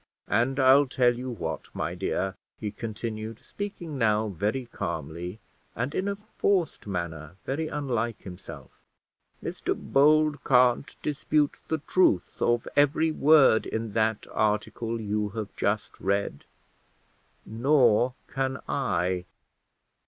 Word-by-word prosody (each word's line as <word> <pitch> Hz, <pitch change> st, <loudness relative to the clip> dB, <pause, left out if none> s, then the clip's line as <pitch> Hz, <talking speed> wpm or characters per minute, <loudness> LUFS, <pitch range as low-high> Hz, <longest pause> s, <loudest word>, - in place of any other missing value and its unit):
"And 120 Hz, +6 st, +1 dB
I'll 135 Hz, +2 st, +6 dB
tell 125 Hz, -1 st, +3 dB
you 125 Hz, +2 st, -5 dB
what, 120 Hz, -, -4 dB
my -, -, -2 dB
dear," 95 Hz, +1 st, -1 dB, 0.2 s
he 105 Hz, -2 st, -4 dB
continued, 110 Hz, 0 st, -5 dB
speaking 175 Hz, -8 st, -6 dB
now 110 Hz, -1 st, +2 dB
very 105 Hz, +7 st, -2 dB
calmly, 90 Hz, -3 st, -5 dB, 0.4 s
and 125 Hz, +6 st, -2 dB
in 190 Hz, -, -1 dB
a 200 Hz, -, -1 dB, 0.2 s
forced 185 Hz, -, +1 dB
manner 85 Hz, -4 st, -4 dB
very 155 Hz, +4 st, -2 dB
unlike 120 Hz, -7 st, -2 dB
himself; 90 Hz, -2 st, -10 dB, 0.7 s
"Mr -, -, -2 dB
Bold 150 Hz, +1 st, +3 dB
can't 125 Hz, 0 st, +3 dB
dispute 150 Hz, 0 st, 0 dB
the 160 Hz, -, 0 dB
truth 150 Hz, -, +1 dB
of 120 Hz, 0 st, +2 dB
every 145 Hz, +3 st, +3 dB
word 145 Hz, -7 st, +5 dB
in 110 Hz, -1 st, -3 dB
that 110 Hz, -1 st, +1 dB
article 110 Hz, +2 st, -1 dB
you 105 Hz, -1 st, -1 dB
have 105 Hz, -2 st, -5 dB
just 100 Hz, +1 st, -1 dB
read 100 Hz, -6 st, -1 dB, 1.0 s
nor 125 Hz, 0 st, +3 dB
can 135 Hz, -1 st, -2 dB
I." 90 Hz, -8 st, 0 dB
120 Hz, 120 wpm, -27 LUFS, 105-140 Hz, 1.0 s, I'll